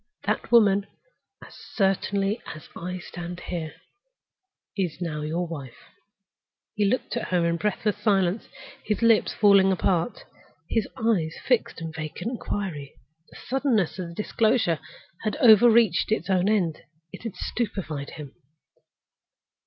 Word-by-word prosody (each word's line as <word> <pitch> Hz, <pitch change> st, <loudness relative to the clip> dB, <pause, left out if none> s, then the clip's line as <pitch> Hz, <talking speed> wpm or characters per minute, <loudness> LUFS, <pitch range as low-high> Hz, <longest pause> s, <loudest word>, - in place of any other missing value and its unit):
That 215 Hz, +2 st, -2 dB
woman—as 210 Hz, -, 0 dB, 0.2 s
certainly 195 Hz, +1 st, +1 dB
as 155 Hz, -, -13 dB
I 180 Hz, +2 st, -5 dB
stand 175 Hz, -1 st, -7 dB
here—is 195 Hz, -, -8 dB
now 160 Hz, -4 st, -3 dB
your 165 Hz, +4 st, -2 dB
wife." 140 Hz, -7 st, -8 dB, 1.0 s
He 210 Hz, -, +1 dB
looked 255 Hz, +6 st, 0 dB
at -, -, -2 dB
her 175 Hz, -2 st, +1 dB
in 170 Hz, 0 st, +1 dB
breathless 210 Hz, +2 st, -1 dB
silence, 200 Hz, -1 st, +1 dB, 0.4 s
his 215 Hz, +2 st, -1 dB
lips 230 Hz, -1 st, +4 dB
falling 200 Hz, -2 st, +5 dB
apart, 185 Hz, +2 st, 0 dB, 0.4 s
his 225 Hz, -2 st, 0 dB
eyes 205 Hz, -10 st, +1 dB
fixed 245 Hz, -9 st, +1 dB
in 165 Hz, -1 st, -4 dB
vacant 160 Hz, +8 st, -5 dB
inquiry. 190 Hz, -, -4 dB, 0.3 s
The -, -, -14 dB
suddenness 245 Hz, -, +1 dB
of 180 Hz, -, -3 dB
the 170 Hz, -, -11 dB
disclosure 215 Hz, -5 st, +1 dB, 0.4 s
had 215 Hz, -, -1 dB
overreached 230 Hz, -2 st, +5 dB
its 220 Hz, -2 st, 0 dB
own 185 Hz, +1 st, +2 dB
end. 180 Hz, -7 st, +1 dB, 0.3 s
It -, -, -9 dB
had 230 Hz, -4 st, -6 dB
stupefied 180 Hz, -11 st, -3 dB
him. 145 Hz, -3 st, -9 dB
195 Hz, 125 wpm, -25 LUFS, 170-220 Hz, 1.0 s, falling